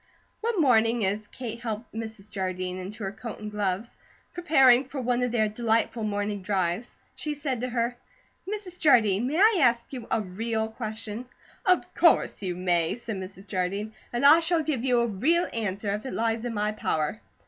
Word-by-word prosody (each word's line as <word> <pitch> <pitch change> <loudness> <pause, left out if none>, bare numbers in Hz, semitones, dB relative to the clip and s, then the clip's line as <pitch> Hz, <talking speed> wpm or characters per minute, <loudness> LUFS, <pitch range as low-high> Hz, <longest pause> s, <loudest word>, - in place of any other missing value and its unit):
One 455 -3 -1
morning 230 -5 +4
as 210 +2 -2
Kate 235 -1 -6
helped 225 -1 -5
Mrs. 220 -2 -7
Jardine 185 -1 -3
into 205 +4 -7
her 195 - -2
coat 220 +2 -7
and 210 0 -6
gloves, 205 +1 -2 0.4
preparing 270 -8 +5
for 275 +1 -7
one 250 0 0
of 250 -1 0
their 220 -2 +2
delightful 225 +1 0
morning 205 -1 -2
drives, 185 +2 -1 0.2
she 300 -1 -3
said 275 -5 -3
to 255 - -2
her: 240 0 -1 0.6
"Mrs. 390 -4 -6
Jardine, 225 -6 +4
may 300 +4 -1
I 420 0 +5
ask 240 0 +2
you 245 -3 -6
a 230 - +2
REAL 220 +3 -2
question?" 220 +1 -6 0.4
"Of 365 0 +2
course - - +3
you 180 -3 -2
may," 175 -2 +1
said 230 -3 -5
Mrs. 190 +1 -8
Jardine, 195 +2 -2 0.2
"and 240 +3 0
I 300 +4 +9
shall 330 -1 +1
give 285 -6 -1
you 250 -2 +3
a - - +2
'real' 270 - +2
answer 205 -2 -2
if 210 - -3
it - - -5
lies 225 +1 0
in 240 - -2
my 210 +1 0
power." 155 - -2
225 Hz, 185 wpm, -27 LUFS, 205-250 Hz, 0.6 s, I